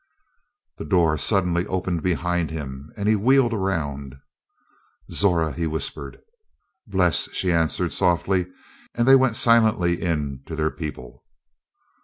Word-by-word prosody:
The -, -, -5 dB
door 80 Hz, 0 st, +2 dB
suddenly 90 Hz, +1 st, +1 dB
opened 90 Hz, -2 st, -2 dB
behind 90 Hz, -1 st, -1 dB
him 70 Hz, -2 st, -7 dB
and 100 Hz, 0 st, -2 dB
he 110 Hz, -, +4 dB
wheeled 120 Hz, +3 st, +3 dB
around. 75 Hz, -, -3 dB, 1.0 s
"Zora!" 85 Hz, -5 st, +1 dB
he 85 Hz, -2 st, -2 dB
whispered. 80 Hz, 0 st, -5 dB, 0.7 s
"Bles," 90 Hz, -6 st, +1 dB
she 90 Hz, -, 0 dB
answered 85 Hz, +1 st, 0 dB
softly, 90 Hz, 0 st, +1 dB, 0.5 s
and 120 Hz, +1 st, 0 dB
they 135 Hz, -, +8 dB
went 130 Hz, -4 st, +3 dB
silently 110 Hz, -8 st, +3 dB
in 75 Hz, -6 st, -2 dB
to 80 Hz, -, -6 dB
their 80 Hz, 0 st, -1 dB
people. 75 Hz, -7 st, -8 dB
90 Hz, 125 wpm, -23 LUFS, 80-95 Hz, 1.0 s, they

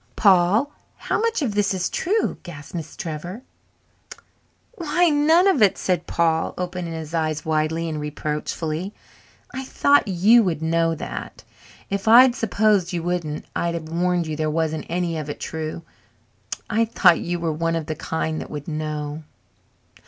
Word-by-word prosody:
"Paul! 200 Hz, +7 st, +4 dB, 0.3 s
How -, -, -1 dB
much 460 Hz, -8 st, 0 dB
of 230 Hz, -6 st, -1 dB
this 205 Hz, -1 st, +1 dB
is 185 Hz, -1 st, -1 dB
true?" 425 Hz, +5 st, -1 dB
gasped 150 Hz, -4 st, -10 dB
Miss 165 Hz, -3 st, -6 dB
Trevor. 175 Hz, -, -6 dB, 1.3 s
"Why, 345 Hz, -2 st, +2 dB
none 320 Hz, +5 st, +4 dB
of 370 Hz, -, +3 dB
it!" 200 Hz, -3 st, +5 dB
said 180 Hz, -2 st, -1 dB
Paul, 165 Hz, -1 st, +1 dB
opening 180 Hz, -2 st, -4 dB
his 160 Hz, -1 st, -7 dB
eyes 155 Hz, -2 st, -1 dB
widely 160 Hz, +1 st, 0 dB
and 155 Hz, -2 st, -3 dB
reproachfully. 155 Hz, +4 st, -3 dB, 0.6 s
"I 265 Hz, -, -4 dB
thought 285 Hz, 0 st, +3 dB
you 200 Hz, +6 st, +5 dB
would 170 Hz, -6 st, -1 dB
know 165 Hz, 0 st, +1 dB
that. 60 Hz, -, -7 dB, 0.5 s
If 200 Hz, +1 st, -2 dB
I'd 245 Hz, +3 st, +8 dB
s'posed 205 Hz, -4 st, +1 dB
you 170 Hz, -1 st, -2 dB
wouldn't 170 Hz, -4 st, -3 dB
I'd 170 Hz, 0 st, -1 dB
have 160 Hz, -2 st, -6 dB
warned 175 Hz, +1 st, 0 dB
you 155 Hz, -1 st, -3 dB
there 155 Hz, 0 st, -1 dB
wasn't 160 Hz, 0 st, -1 dB
any 170 Hz, -1 st, -1 dB
of 150 Hz, -1 st, -6 dB
it 145 Hz, -, -5 dB
true. 160 Hz, +1 st, -5 dB, 0.8 s
I 230 Hz, +1 st, +2 dB
thought 180 Hz, -6 st, +4 dB
you 175 Hz, 0 st, -3 dB
were 165 Hz, -2 st, -1 dB
one 165 Hz, +1 st, -1 dB
of 165 Hz, -2 st, -2 dB
the 155 Hz, -, -3 dB
kind 160 Hz, 0 st, -3 dB
that -, -, -8 dB
would 145 Hz, -1 st, -7 dB
know." 150 Hz, -1 st, -4 dB
170 Hz, 160 wpm, -23 LUFS, 155-205 Hz, 1.3 s, I'd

